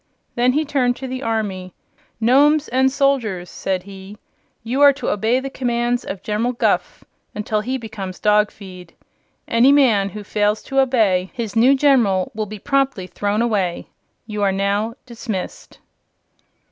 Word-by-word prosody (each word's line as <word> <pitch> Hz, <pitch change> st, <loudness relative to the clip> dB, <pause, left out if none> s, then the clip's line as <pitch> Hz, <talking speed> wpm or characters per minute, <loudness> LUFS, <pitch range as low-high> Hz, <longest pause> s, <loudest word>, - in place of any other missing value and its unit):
Then 245 Hz, +1 st, +2 dB
he 310 Hz, +3 st, 0 dB
turned 255 Hz, -4 st, +1 dB
to 265 Hz, -, -7 dB
the 255 Hz, 0 st, -5 dB
army. 205 Hz, -6 st, -3 dB, 0.4 s
"Nomes 285 Hz, +6 st, +4 dB
and 260 Hz, +2 st, +2 dB
soldiers," 250 Hz, -, 0 dB
said 185 Hz, -2 st, -3 dB
he, 195 Hz, +1 st, -11 dB, 0.5 s
"you 250 Hz, +5 st, -2 dB
are 285 Hz, -1 st, +8 dB
to 275 Hz, -, -4 dB
obey 220 Hz, +5 st, +1 dB
the 270 Hz, +1 st, -6 dB
commands 240 Hz, -1 st, -1 dB
of 195 Hz, 0 st, -7 dB
General 220 Hz, +4 st, -1 dB
Guph 235 Hz, -, -1 dB, 0.3 s
until 210 Hz, 0 st, -1 dB
he 255 Hz, +4 st, -2 dB
becomes 205 Hz, -6 st, -7 dB
dog 210 Hz, 0 st, +3 dB
feed. 185 Hz, -4 st, -13 dB, 0.5 s
Any 235 Hz, +4 st, +4 dB
man 230 Hz, -9 st, +3 dB
who 210 Hz, +1 st, -8 dB
fails 210 Hz, +1 st, 0 dB
to 270 Hz, 0 st, -1 dB
obey 215 Hz, -9 st, +2 dB
his 225 Hz, -5 st, -5 dB
new 250 Hz, +5 st, +5 dB
General 255 Hz, -7 st, +2 dB
will 215 Hz, -1 st, -3 dB
be 215 Hz, +1 st, -8 dB
promptly 275 Hz, -4 st, 0 dB
thrown 205 Hz, +4 st, -1 dB
away. 195 Hz, -7 st, -1 dB, 0.4 s
You 210 Hz, -2 st, -5 dB
are 200 Hz, -1 st, +2 dB
now 200 Hz, +4 st, -1 dB
dismissed." 225 Hz, -5 st, -6 dB
225 Hz, 155 wpm, -20 LUFS, 200-260 Hz, 0.5 s, are